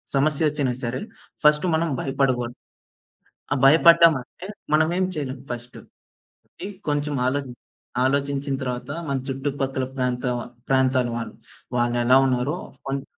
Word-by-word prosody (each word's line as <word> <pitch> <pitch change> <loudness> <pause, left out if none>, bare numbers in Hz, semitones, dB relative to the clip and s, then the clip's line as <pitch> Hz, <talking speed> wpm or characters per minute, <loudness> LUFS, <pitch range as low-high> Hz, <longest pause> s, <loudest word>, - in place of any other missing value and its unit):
సమస్య 150 +2 +2
ఒచ్చినా 140 -4 0
సరే, 120 +1 -2 0.4
ఫస్ట్ 150 +3 +5
మనం 165 +1 +1
భయపడగూడదు. 130 -3 0 1.0
ఆ - - +1
భయపడ్డామంటే, 165 +1 +5 0.3
మనం 155 +1 +4
ఏం 185 - +2
చేయలేం 135 -3 -4
ఫస్ట్. 120 +1 -7 0.7
ఆగి - - -8 0.2
కొంచెం 145 0 0
ఆలో 140 +3 +1 0.6
ఆలోచించిన 140 0 0
తరువాత 125 +1 -4 0.2
మన 140 - 0
చుట్టుపక్కల 135 -1 -2
ప్రాంత 125 0 -1
వ - - -3 0.3
ప్రాంతాల 130 -2 +2
వాళ్ళు 115 - -5 0.4
వాళ్ళేలా 120 +1 +3
ఉన్నారో 130 +5 0 0.3
కొంచేం 135 0 -2
135 Hz, 120 wpm, -23 LUFS, 125-145 Hz, 1.0 s, ఫస్ట్